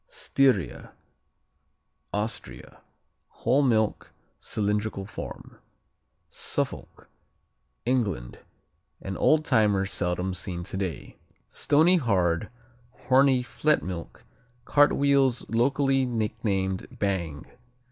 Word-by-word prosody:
Styria 135 - 0 1.2
Austria 105 +2 -5 0.5
Whole 130 +5 +1
milk. 110 -6 +1 0.3
Cylindrical 105 -1 -2
form. 110 - -9 0.7
Suffolk - - -4 0.8
England 105 - -1 0.6
An 95 0 -5
old 155 0 +3
timer, 105 -5 +3
seldom 90 -1 -1
seen 90 -1 -5
today. 95 -3 -5 0.3
Stony 165 +5 +3
hard, 95 - +1 0.4
horny 130 0 +3
"flet 150 +4 +1
milk" 90 -2 -7 0.4
cartwheels 140 -3 +3
locally 135 +3 +2
nicknamed 105 -5 -2
"bang." 85 -6 -2
110 Hz, 75 wpm, -26 LUFS, 95-135 Hz, 1.2 s, old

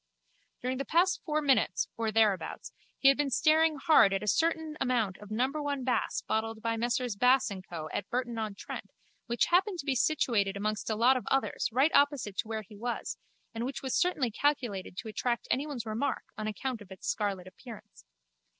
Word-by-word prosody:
During 255 +1 -1
the 275 - -2
past 355 +3 +2
four 305 -1 0
minutes 275 -3 +2
or 225 -1 -1
thereabouts 215 -3 +1 0.2
he 270 - +3
had 275 - +6
been 290 -1 +1
staring 310 +4 +4
hard 275 -8 +5
at 195 - -2
a - - -5
certain 320 - +1
amount 230 -7 +1
of 210 - -12
number 260 +7 0
one 285 -2 -2
Bass 250 0 0
bottled 220 0 -1
by 230 0 0
Messrs 240 0 -1
Bass 250 +1 +4
and 190 -2 -6
Co 165 -4 -6
at 200 - -3
Burton 240 -2 -2
on 215 -2 -3
Trent - - -7 0.4
which 235 0 +2
happened 370 +1 +3
to 290 - -6
be 275 - +1
situated 230 -8 +1
amongst 215 +2 -2
a 220 - 0
lot 245 +4 +4
of 255 - -6
others 270 0 0
right 270 +7 +3
opposite 285 -8 +2
to - - -1
where 220 -1 -3
he 210 +1 -15
was 235 +4 -4 0.3
and 230 0 -3
which 265 +3 -4
was 265 - -2
certainly 295 -10 +1
calculated 230 -9 -1
to 230 - -5
attract 235 +3 -2
anyone's 275 -3 -1
remark 220 +6 -2
on 215 0 -4
account 235 +2 -3
of 200 - -13
its 190 -1 -9
scarlet 200 -3 -1
appearance. 185 - -12
240 Hz, 195 wpm, -30 LUFS, 215-275 Hz, 0.4 s, had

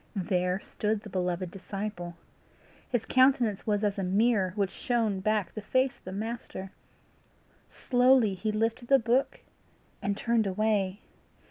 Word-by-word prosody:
There 180 0 0
stood 210 +1 -2
the 210 - -10
beloved 180 -1 -2
disciple! 195 -2 -6 0.7
His 245 -3 -1
countenance 255 -6 +3
was 205 0 +1
as 205 -1 0
a - - -1
mirror 195 0 +2
which 200 -3 0
shone 225 -5 0
back 210 -1 0
the 215 - -5
face 255 +5 0
of - - -36
the 185 - -6
Master. 205 -2 -5 1.0
Slowly 250 -4 +3
he 215 +4 -2
lifted 225 +3 -1
the 275 - +6
book, 250 +3 0 0.6
and 200 0 -1
turned 230 -2 +1
away. 200 0 0
210 Hz, 140 wpm, -29 LUFS, 190-235 Hz, 1.0 s, the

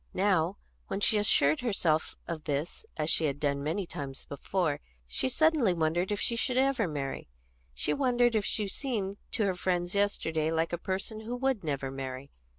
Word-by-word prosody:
Now, 185 -1 +2 0.3
when 195 - -2
she 210 +1 +4
assured 155 -7 +4
herself 175 -10 +1
of 165 -3 -5
this, 145 +2 -3
as 155 +1 +1
she 160 - +3
had 140 -1 -1
done 140 -1 0
many 165 +7 -1
times 140 -5 -6
before, 150 +1 -1 0.3
she - - 0
suddenly 295 - +3
wondered 170 +4 +1
if 205 - 0
she 235 - +1
should 250 +2 0
ever 265 -5 +3
marry; 140 -3 -4 0.5
she 60 - 0
wondered 245 -3 +3
if 215 -2 +2
she 210 - 0
had 195 - -3
seemed 205 -8 -2 0.2
to 220 - +2
her 190 - +2
friends 180 -1 -1
yesterday 160 -6 +1
like 165 +1 0
a 175 - -1
person 195 +4 -3
who 225 +3 -4
would 260 -4 0
never 140 -3 -2
marry. 135 0 -6
180 Hz, 185 wpm, -30 LUFS, 150-215 Hz, 0.5 s, she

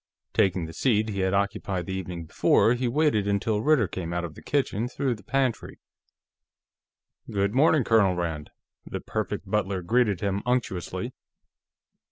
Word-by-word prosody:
Taking 90 -3 +2
the 80 - -9
seat 110 +1 +1
he 100 -2 -3
had 95 0 +1
occupied 100 -2 -1
the 95 - -4
evening 90 -3 -5
before, 110 +7 +3
he 125 0 -1
waited 125 -6 +2
until 105 +1 0
Ritter 140 -6 +3
came 85 0 -5
out 85 0 -1
of 80 - -8
the - - -13
kitchen 125 -5 0
through 130 0 -1
the 105 - -10
pantry. 130 +1 -1 1.5
"Good 100 0 0
morning, 150 +1 +4
Colonel 105 -5 +3
Rand," 80 -4 -3 0.3
the - - -5
Perfect - - -3
Butler 95 -2 -1
greeted 105 -1 +2
him 100 0 -1
unctuously. 120 -8 -2
100 Hz, 155 wpm, -26 LUFS, 90-125 Hz, 1.5 s, morning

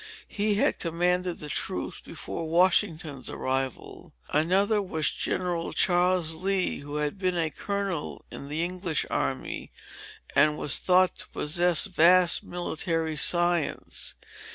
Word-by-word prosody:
He 210 0 0
had 205 - +1
commanded 180 +1 0
the 150 - -8
troops 90 -10 -4
before 165 -1 -6
Washington's 165 -5 +1
arrival. 130 -1 -3 0.2
Another 195 +7 +2
was 160 -5 0
General 175 -2 -2
Charles 175 -2 +2
Lee, 185 +3 0
who 145 +1 -8
had 150 +4 -2
been 185 -2 0
a 160 -2 0
colonel 200 -3 -4
in 140 - -8
the 155 +3 -2
English 180 -2 -1
army, - - -3 0.6
and 150 +2 +4
was 145 - +1
thought 185 0 +4
to - - -8
possess 175 +3 +2
vast 180 -1 +4
military 165 -2 -2
science. 175 +1 0
175 Hz, 125 wpm, -27 LUFS, 155-185 Hz, 0.6 s, and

